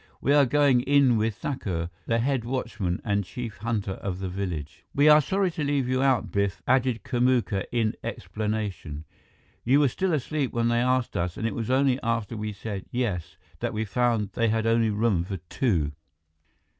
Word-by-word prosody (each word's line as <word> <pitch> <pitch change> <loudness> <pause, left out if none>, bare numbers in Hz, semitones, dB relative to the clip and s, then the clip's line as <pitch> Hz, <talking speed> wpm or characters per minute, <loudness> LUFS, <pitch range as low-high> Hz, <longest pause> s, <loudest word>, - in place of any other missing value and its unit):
We 140 - +2
are 145 -2 +5
going 140 -2 +4
in 140 -2 +4
with 110 -1 0
Thakur, 90 - -3 0.2
the 115 - +2
head 130 +1 0
watchman 115 -7 -2
and 100 -2 0
chief 115 +3 -7
hunter 110 -3 -2
of 95 -1 -4
the 95 -1 -4
village." 90 -6 -5
"We 145 +2 +5
are 150 0 +8
sorry 190 +4 0
to 160 - -3
leave 140 -3 0
you 130 0 +1
out, 135 -4 +2
Biff," 100 -1 -1
added 125 -2 +2
Kamuka 120 -5 +1
in 115 -3 +1
explanation. 105 -8 -4 0.6
"You 135 +4 +4
were 145 -2 +4
still 185 +9 -1
asleep 145 -1 -2
when 115 0 +1
they 120 0 +2
asked 125 0 +1
us, 85 0 -2
and - - -3
it 115 - 0
was 115 +1 -4
only 130 0 +3
after 115 -1 -1
we 105 0 -3
said, 100 -1 -6
'Yes,' 110 -9 -2 0.2
that - - -2
we 110 +1 -1
found 110 0 0
they 115 - +1
only 115 0 +2
had 105 - -2
room 105 -6 +2
for 95 +2 -5
two." 85 - -1
115 Hz, 185 wpm, -26 LUFS, 100-130 Hz, 0.6 s, are